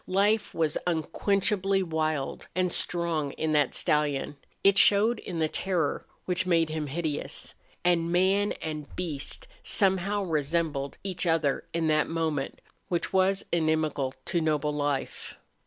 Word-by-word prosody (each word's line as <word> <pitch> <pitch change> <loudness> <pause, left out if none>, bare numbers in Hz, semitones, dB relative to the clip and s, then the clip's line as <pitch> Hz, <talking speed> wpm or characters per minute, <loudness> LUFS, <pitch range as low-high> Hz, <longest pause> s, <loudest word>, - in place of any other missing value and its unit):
Life 205 +3 +2
was 160 -2 +1
unquenchably 195 +3 +1
wild 155 -4 -2
and 180 -1 +1
strong 165 -6 -1
in 160 0 -1
that 150 -3 +2
stallion; 145 -1 +1 0.3
it 195 0 +6
showed 215 +3 +5
in 180 - -6
the 160 -1 +2
terror 175 -2 -1 0.2
which 180 0 0
made 165 -3 +3
him 155 -1 -3
hideous. 150 0 -2 0.3
And 170 -1 +2
man 190 +3 +3
and 155 -2 -4
beast 170 - -3
somehow 195 0 +2
resembled 155 -3 -1
each 185 -2 -2
other 160 -4 +1
in 165 -1 -1
that 155 -1 +2
moment 160 -4 -2 0.3
which 175 -2 -2
was 190 +1 +2
inimical 155 -5 0
to 170 -2 0
noble 150 -1 +1
life. 145 -2 -3
165 Hz, 135 wpm, -28 LUFS, 150-185 Hz, 0.3 s, it